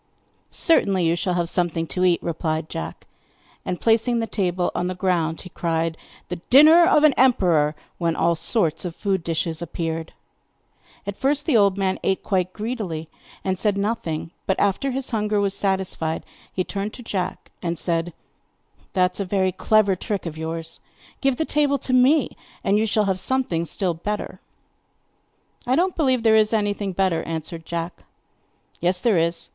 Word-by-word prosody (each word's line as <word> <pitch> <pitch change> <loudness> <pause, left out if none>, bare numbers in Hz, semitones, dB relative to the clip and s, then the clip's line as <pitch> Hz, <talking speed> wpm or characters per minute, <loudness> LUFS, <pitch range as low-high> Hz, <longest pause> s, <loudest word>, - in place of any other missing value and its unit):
'Certainly, 195 - +3
you 165 +1 +2
shall 180 +1 -1
have 175 -1 0
something 170 -2 0
to 180 +2 -2
eat,' 180 -2 +3
replied 160 -1 -2
Jack. 165 - -6 0.6
And, 180 -1 -3
placing 230 +1 +2
the 230 - 0
table 180 -5 -1
on 180 - -1
the 185 - -3
ground 175 -3 0
he 180 - -10
cried: 165 -1 -1 0.3
'The 180 - -3
dinner 315 +6 +8
of 305 -5 +4
an 305 -2 +6
emperor!' 175 - +3 0.2
when 170 -2 0
all 170 - +2
sorts 165 0 0
of 175 -2 -5
food 190 -4 -1
dishes 165 0 -2
appeared. 165 -1 -4 0.9
At 200 0 -4
first 285 +4 0
the 305 - +2
old 200 -3 +4
man 190 -1 0
ate 190 - 0
quite 185 -2 0
greedily, 205 -8 -4 0.3
and 190 -1 -1
said 205 -1 +1
nothing; 200 -7 -2 0.2
but, 190 - +1
after 205 +7 +1
his 265 +1 -3
hunger 210 -2 0
was 200 -1 +1
satisfied, 190 -5 -1 0.3
he 185 - -1
turned 200 +3 -4
to 245 - -10
Jack 190 -5 -4
and 170 -2 -2
said: 170 0 -1 0.8
'That 180 -1 +2
is - - -7
a 200 - -1
very 190 0 +1
clever 200 +1 +3
trick 200 +2 -4
of 165 -2 -5
yours. 160 +1 -5 0.4
Give 270 -2 +2
the 320 - 0
table 290 -2 +2
to 255 0 -3
me 260 +3 +4 0.3
and 200 +2 +3
you 220 - +1
shall 210 0 +2
have 190 -1 0
something 190 -7 0
still 180 +1 -1
better.' 205 +6 -4 1.3
'I 255 - +3
don't 360 +4 +1
believe 260 -7 +1
that 225 - +4
there 220 - +6
is 215 0 +3
anything 205 -2 0
better,' 185 -2 +1
answered 165 0 -6
Jack. 170 0 -4 0.8
'Yes, 180 +2 +1
there 210 -4 +3
is. 170 +1 -1
190 Hz, 175 wpm, -23 LUFS, 170-220 Hz, 1.3 s, dinner